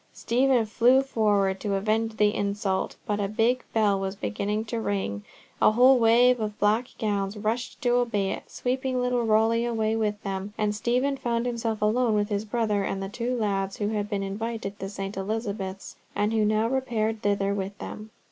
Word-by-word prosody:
Stephen 250 0 +2
flew 245 +5 +4
forward 205 -6 +1
to 200 -2 -1
avenge 220 +2 0
the 210 0 +3
insult, 200 -1 -1
but 210 -1 -1
a 200 - 0
big 230 +5 +1
bell 210 -3 +2
was 195 0 -3
beginning 200 - -2
to 230 +1 -3
ring, 190 - -2 0.4
a - - +5
whole 255 +3 +6
wave 240 +2 +5
of 210 -1 -3
black 215 +4 +2
gowns 205 -1 -1
rushed 225 +4 -2
to 245 - +2
obey 230 -5 +1
it, - - -6
sweeping 255 0 -2
little 250 -1 +1
Rowley 225 +1 +3
away 225 -2 0
with 210 -2 -1
them; 195 +1 -4
and 210 -1 0
Stephen 250 +6 0
found 235 -2 -1
himself 230 -3 -2
left 210 0 +3
alone 240 -3 +2
with 205 0 0
his 205 0 -1
brother 215 -2 0
and 195 0 -3
the 195 - -4
two 245 +4 -2
lads 195 -3 -1
who 205 -1 -1
had 210 -1 -2
been 200 -2 -1
invited 210 +1 -4
to 195 - -4
St. 195 0 -5
Elizabeth's, 200 -1 -4 0.2
and 210 +2 +1
who 220 -1 +2
now 215 +1 +2
repaired 225 -4 -1
thither 200 -1 +1
with 200 0 -4
them. 215 +1 -8
215 Hz, 190 wpm, -26 LUFS, 200-235 Hz, 0.4 s, whole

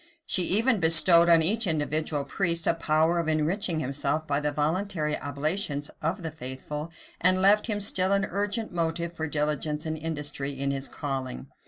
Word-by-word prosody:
She 180 - +2
even 225 +5 +3
bestowed 170 +1 +6
on 165 -1 +6
each 215 +5 +1
individual 155 -2 -1
priest 170 +3 0
a - - +3
power 160 +1 +1
of 165 - -2
enriching 160 +2 0
himself 145 +3 -1
by 140 -2 0
the 150 0 -1
voluntary 155 +1 -1
oblations 145 +1 -2
of 170 +4 -2
the 160 - -4
faithful, 150 +2 -6 0.3
and 185 +1 +4
left 205 +3 +4
him 210 -3 -2
still 190 -1 +2
an 200 0 +2
urgent 205 +3 -2
motive 170 0 -2
for 160 -1 -4
diligence 150 +1 -2
and 160 0 -2
industry 145 -3 -4
in 140 0 -1
his 135 0 -2
calling. 130 - -5
160 Hz, 170 wpm, -26 LUFS, 150-180 Hz, 0.3 s, bestowed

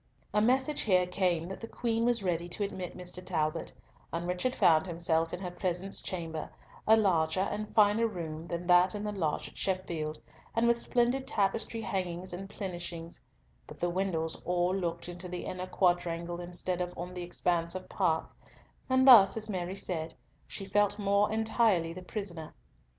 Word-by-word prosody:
A 210 - +3
message 260 +6 +2
here 185 -4 +3
came 180 -2 0
that 190 - -7
the 230 - -5
Queen 230 -1 -1
was 240 -3 +1
ready 175 -1 -1
to 205 +4 -3
admit 185 -3 -5
Mr. 180 0 -3
Talbot, 155 -4 -1 0.4
and 170 +1 -3
Richard 180 +9 -1
found 160 +1 +4
himself 165 -1 +1
in - - -4
her 180 -2 -5
presence 180 +1 -2
chamber, 165 -4 -4 0.4
a 220 +1 +7
larger 175 -4 +2
and 205 +2 -3
finer 215 +1 +5
room 165 -5 -6
than 170 0 -4
that 180 +2 +5
in 205 - -4
the 210 - -2
lodge 165 -7 -2
at - - -13
Sheffield, 170 -5 -2 0.4
and 230 +1 +3
with 235 0 +3
splendid 250 +2 +1
tapestry 225 +2 0
hangings 185 -3 -3
and 195 +2 -6
plenishings; 175 -4 -6 0.5
but - - -11
the 175 0 0
windows 170 -3 -1
all 180 +1 +1
looked 170 -3 -3
into 175 +1 -6
the 180 0 -5
inner 185 0 -4
quadrangle, 175 -2 0
instead 180 +1 -3
of 180 0 -2
on 180 +1 -5
the 180 - -5
expanse 175 -1 -1
of 185 - -6
park, 165 -5 0 0.5
and 260 +1 +4
thus, 225 -5 +9
as 220 0 -1
Mary 185 0 -3
said, 165 -4 -3 0.3
she 195 - -6
felt 205 +1 +2
more 200 0 +2
entirely 220 -6 +2
the 185 - -8
prisoner. 180 -5 -6
180 Hz, 175 wpm, -30 LUFS, 170-205 Hz, 0.5 s, thus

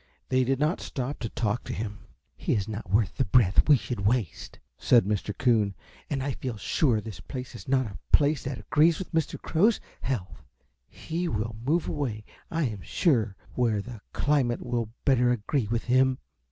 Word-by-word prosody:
They 130 0 +3
did 135 +1 0
not 150 +4 +1
stop 130 +2 -4
to 115 - -3
talk 110 +1 -1
to - - -4
him. 105 -1 -4 0.4
"He - - -1
is 100 -3 -1
not 105 -3 -6
worth 100 -2 +1
the 130 - +2
breath 105 +3 +4
we 145 - +8
should 120 -2 -5
waste," 105 -3 -1 0.2
said 120 -6 +5
Mr. 105 0 -2
Coon, 110 -6 +2 0.3
"and 135 -3 -1
I 140 - -1
feel 125 -3 -4
sure 115 +3 +2
this 105 -3 -8
place 130 -2 -7
is 120 - -10
not 130 -1 +2
a 100 -2 -8
place 145 -1 +4
that 135 -1 -3
agrees 155 +2 +3
with 190 - -7
Mr. 160 -1 0
Crow's 205 +8 +2 0.2
health. 105 -9 -3 0.5
He 170 +2 -4
will 110 -3 -2
move 155 +6 +1
away, 120 -9 -3 0.2
I 165 -1 0
am 110 -7 -2
sure, 115 - +1 0.2
where 115 -4 +1
the 115 +1 -8
climate 135 -5 +1
will 120 -2 -1 0.2
better 125 -3 +4
agree 120 +1 0
with 115 +2 -1
him." 130 +1 +3
125 Hz, 185 wpm, -27 LUFS, 105-140 Hz, 0.5 s, we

